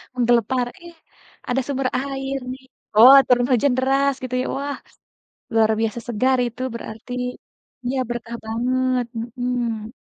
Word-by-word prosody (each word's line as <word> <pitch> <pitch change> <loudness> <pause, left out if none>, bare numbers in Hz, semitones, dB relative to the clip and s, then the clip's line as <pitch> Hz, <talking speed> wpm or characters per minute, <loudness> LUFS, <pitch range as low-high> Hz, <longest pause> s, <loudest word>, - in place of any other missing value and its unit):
Menggelepar, 240 +1 +2 0.2
iya, 340 0 -11 0.5
ada 255 +2 +1
sumber 270 -2 -1
air 270 0 -3 0.2
nih. 260 - -13 0.3
Oh 245 +5 +10
turun 245 -1 +3
hujan 250 +2 +3
deras 275 +2 +2
gitu 255 0 -3
ya, - - -3
wah, 285 0 -3 0.8
luar 220 -1 +4
biasa 225 +1 -1
segar 255 +3 +2
itu 240 +1 -6
berarti, 230 +1 -8 0.7
iya, 255 +2 -1
berkah 235 -1 -5
banget, 250 +2 0 0.3
hmm. 235 -3 -2
250 Hz, 130 wpm, -22 LUFS, 235-265 Hz, 0.8 s, Oh